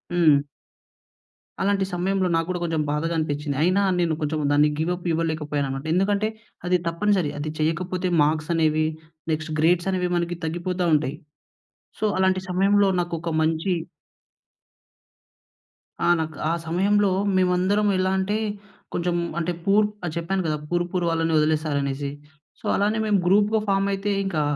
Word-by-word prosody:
హ్మ్. 155 -5 +5 1.3
అలాంటి 195 0 +2
సమయంలో 185 +1 0
నాకు 165 0 +1
గూడా 180 -1 -2
కొంచెం 165 -2 0
బాధగా 165 +3 -1
అనిపించింది. 145 -2 -2
అయినా 185 +4 +3 0.2
నేను 170 -2 +1
కొంచెం 155 0 -1
దాన్ని 150 +1 +4
గివ్‌ 160 +3 0
అప్ 180 - -11
ఇవ్వలేకపోయానన్నమాట. 150 -4 -2
ఎందుకంటే 200 +3 +1 0.4
అది 180 0 +3
తప్పనిసరి. 180 -2 +1
అది 150 +1 -3
చేయకపోతే 180 +4 -1
మార్క్స్ 155 +2 0
అనేవి 155 -1 +2 0.5
నెక్స్ట్ 155 0 -3
గ్రేడ్స్ 175 +3 +3
అనేవి 180 -1 -1
మనకి 175 0 -1
తగ్గిపోతా 175 +2 -2
ఉంటాయి. 150 -1 0 0.8
సో - - -1
అలాంటి 190 0 +2
సమయంలో 200 +2 +3
నాకొక 170 -1 -3
మంచి 160 +4 0 2.3
ఆ! - - +3
నాకు 155 -2 -4
ఆ - - +2
సమయంలో 200 +4 +2 0.3
మేమందరం 185 +3 +2
ఎలా 185 0 +1
అంటే 205 +3 0 0.6
కొంచెం 175 0 -1 0.2
అంటే 170 +1 -1
పూర్ 210 +2 +4 0.2
ఆహ్, 155 - -3
చెప్పాను 185 +3 -1
కదా! 155 -1 0
పూర్ 175 0 +1
పూర్ 180 -2 0
వాళ్ళని 165 0 0
వదిలేసారు 155 -1 +1
అనేసి. 140 0 -3 0.5
సో - - -10
అలానే 210 +2 +1
మేము 205 -2 +3
గ్రూప్‌గా 210 +4 +3
ఫార్మ్ 195 0 +2
అయితే 200 +1 -1
ఇంకా 165 -6 -1
175 Hz, 140 wpm, -24 LUFS, 155-190 Hz, 2.3 s, హ్మ్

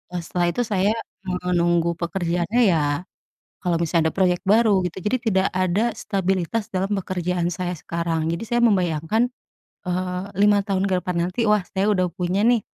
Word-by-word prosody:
eee, 175 - -1
setelah 175 +1 -1
itu, 245 +8 0
saya 210 -1 +1 0.3
menunggu 175 -2 +1
pekerjaannya 175 +6 0
ya 150 0 0 0.6
kalau 170 -2 +1
misalnya 165 -1 +1
ada - - -30
proyek 180 -2 +3
baru, 205 -2 +4
gitu. 180 +1 -4
Jadi, 210 +7 0 0.2
tidak 190 0 +3
ada 190 +6 +1
stabilitas 195 +2 -1
dalam 195 0 -2
pekerjaan 180 -1 -2
saya 180 0 -3
sekarang. 165 -1 -2
Jadi 170 +6 -2
saya 240 +1 0
membayangkan, 195 +2 +2 0.6
eee, 180 +1 -2
5 205 +2 +4
tahun 190 -2 0
ke - - +2
depan 180 0 -3
nanti, 230 +5 -1
wah, 210 -2 +3
saya 195 +1 0
udah 185 -2 +1
punya 180 +3 -1
nih 235 -2 +3
185 Hz, 165 wpm, -23 LUFS, 175-205 Hz, 0.6 s, baru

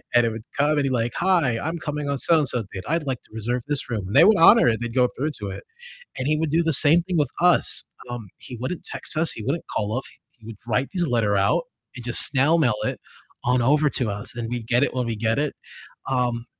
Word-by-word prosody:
And 120 -1 +5
it - - +1
would 110 0 -8
come 150 +1 +1
and 145 - +1
he'd 135 - -1
like, 120 -1 -1
"Hi, 170 -11 +1
I'm 165 +3 -4
coming 150 -3 -5
on 140 - -1
so-and-so 145 -8 +1
date, 95 -1 -6
I'd 165 -1 -1
like 130 -3 -3
to - - -28
reserve 120 +2 -3
this 145 -3 +1
room," 105 -5 -4
and 100 - -6
they - - +7
would 210 -2 +5
honor 185 - +6
it, 110 - -1
they'd 120 0 -5
go 125 -1 +3
through 150 +4 -2
to 100 - -4
it. - - -8 0.6
And 130 - -3
he 155 - +1
would 160 -1 -2
do 165 +2 +2
the 160 - 0
same 155 +5 +6
thing 180 -1 -4
with 145 -4 0
us. 180 0 +4 0.3
Um, 120 -4 -7
he 125 - -10
wouldn't 170 +7 -5
text - - -3
us, 160 0 +4
he 110 - -8
wouldn't 145 +6 -3
call 105 +3 -2
up, 130 - -3 0.4
he 110 - -18
would 115 -3 -9
write 120 +4 -1
these 175 -3 -1
letter 115 -5 0
out 100 - +1 0.3
and 120 - -9
just 120 - +8
snail 145 +5 +2
mail 125 -8 +2
it - - -3 0.4
on 125 0 +1
over 150 +4 +2
to 120 -4 -3
us, 105 +4 -5
and 115 -1 -5
we'd 120 -2 -5
get 120 +2 +1
it - - -3
when 125 -2 -2
we 115 - -3
get 115 +4 -1
it. 150 0 -2 0.6
Um, 120 -2 -1
130 Hz, 255 wpm, -22 LUFS, 115-155 Hz, 0.6 s, just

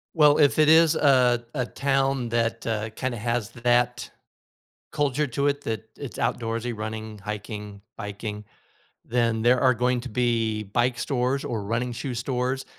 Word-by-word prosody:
Well, 150 -1 +5
if 145 0 +4
it 155 0 +5
is 160 0 +6
a 125 -5 +4
a 125 -4 -1
town 135 -3 0
that, 115 0 -1
uh, 110 -1 -2
kinda 125 +1 -3
has 115 -1 -2
that 120 0 +1 0.8
culture 145 0 0
to 140 +3 0
it, 145 0 0
that 110 -2 -4
it's 140 -4 -7
outdoorsy, 115 0 -2
running, 110 0 -5
hiking, 105 0 -6 0.2
biking, 105 0 -6 0.6
then 115 -2 0
there 125 +1 +4
are 130 -2 +4
going 125 +1 +1
to 130 - -7
be 115 -2 0
bike 120 +4 0
stores 130 +1 -1
or 110 -4 -3
running 120 +3 -1
shoe 125 +1 -4
stores 125 +2 -2
120 Hz, 155 wpm, -25 LUFS, 110-130 Hz, 0.8 s, is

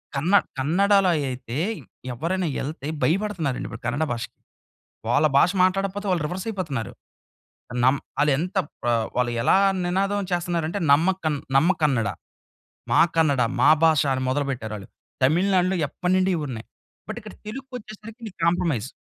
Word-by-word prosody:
కన్న 160 +8 0 0.2
కన్నడా‌లో 190 +7 +3 0.2
అయితే, 125 0 -6 0.6
ఎవ్వరైనా 170 +7 -1
ఎ‌ళ్తే 145 0 -5 0.2
భయపడుతున్నారండి! 170 -7 0
ఇప్పుడు 115 0 -9
కన్నడ 145 +6 0
భాషకి. 115 -1 -6 0.7
వాళ్ళ 145 +5 +4
భాష 175 - +5
మాట్లాడపోతే 195 +2 0
వాళ్ళు 175 -4 +1
రివర్స్ 180 +5 -5
అయిపోతున్నారు. 155 - -3 0.9
నమ్ 130 +2 +4 0.2
అది 150 - +4
ఎంత 180 +4 -4 0.3
ఆహ్, 115 -2 +1
వాళ్ళు 125 -1 +1
ఎలా 190 - +4 0.3
నినాదం 195 +2 0
చేస్తున్నారంటే 175 0 -1
నమ్మకన్ 160 -1 +2 0.2
నమ్మ 160 +7 +4
కన్నడ 130 -7 +2 0.8
మా - - +5 0.2
కన్నడ, 145 -6 +3 0.2
మా - - +5
భాష 160 -3 +5
అని 130 0 -1
మొదలుపెట్టారు 130 -5 -2
ఆళ్ళు. 100 -2 -10 0.4
తమిళనాడులో 185 +5 +3
ఎప్పటినుండి 185 +5 0
ఇవున్నాయి. 130 -7 -5 0.4
బట్ - - -4
ఇక్కడ - - -11
తెలుగుకి 265 +4 -8
వచ్చేసరికి 215 +1 -12
నీకు 200 - -10
కాంప్రమైజ్. 165 -9 +1
165 Hz, 130 wpm, -24 LUFS, 135-190 Hz, 0.9 s, భాష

